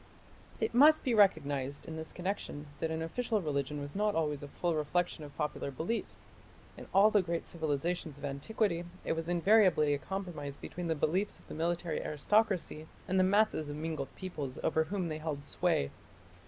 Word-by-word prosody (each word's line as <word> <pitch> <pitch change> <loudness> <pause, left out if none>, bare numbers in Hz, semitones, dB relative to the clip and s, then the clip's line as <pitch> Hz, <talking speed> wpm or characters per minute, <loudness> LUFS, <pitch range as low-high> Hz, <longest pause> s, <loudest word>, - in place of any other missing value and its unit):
It - - 0
must 300 +5 +7
be 250 - +1
recognized, 145 - +2
in 160 - -5
this 160 0 -5
connection, 180 -5 -4
that 160 - -1
an 160 0 -2
official 220 +6 -1
religion 145 -3 -2
was 145 +3 -6
not 210 +1 +1
always 150 -3 0
a 145 - -6
full 170 +4 -1
reflection 160 +2 0
of 145 -1 -11
popular 150 -2 -2
beliefs. 160 - -4 0.5
In - - -10
all 200 +3 +6
the 210 - +5
great 170 -2 -2
civilizations 160 0 -2
of 145 - -6
antiquity 170 +6 -1 0.2
it - - 0
was 165 +1 -3
invariably 175 -4 +5
a 145 - -1
compromise 155 -4 -5
between 175 +3 -5
the 160 - +1
beliefs 180 +7 0
of - - -21
the - - -8
military 170 0 -1
aristocracy 175 -1 +1 0.2
and 190 +1 +2
the - - +6
masses 195 -5 +3
of 145 - -4
mingled 155 -2 -3
peoples 150 -9 -5
over 160 0 +2
whom 190 +1 -2
they 155 -2 -3
held 150 -3 -4
sway. 155 - +1
165 Hz, 180 wpm, -32 LUFS, 150-190 Hz, 0.5 s, must